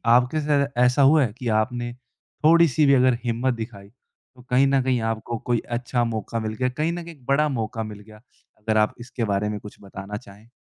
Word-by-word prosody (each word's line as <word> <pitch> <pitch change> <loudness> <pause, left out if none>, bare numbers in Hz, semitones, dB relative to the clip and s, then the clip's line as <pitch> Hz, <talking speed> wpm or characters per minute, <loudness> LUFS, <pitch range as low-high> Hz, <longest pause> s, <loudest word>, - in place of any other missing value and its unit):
आपके 125 +5 +2
साथ 145 -1 +2 0.2
ऐसा 125 +3 +3
हुआ 140 +2 +6
है 110 -4 -2
कि 125 - -5
आपने 120 +1 -3
थोड़ी-सी 155 +3 +2
भी 140 - +5
अगर 130 -2 +4
हिम्मत 120 +2 0
दिखाई, 110 -4 -8
तो 125 +1 -25
कहीं 130 +2 +4
न 135 -1 +3
कहीं 130 -2 +1
आपको 115 +1 -4
कोई 120 +1 -1
अच्छा 120 0 -1
मौका 115 0 -3
मिल 110 -1 -3
गया, 125 +3 -1
कहीं 155 +6 -1
न 175 0 -5
कहीं 165 -1 -10
एक 130 - -24
बड़ा 150 +3 +2
मौका 115 -2 -3
मिल 105 -1 -8
गया? 105 0 -16 0.4
अगर 110 0 0
आप 105 0 +2
इसके 120 0 -5
बारे 105 0 0
में 105 - -4
कुछ 105 - -12
बताना 100 +1 -7
चाहें। 105 -1 -15
120 Hz, 215 wpm, -23 LUFS, 110-135 Hz, 0.4 s, हुआ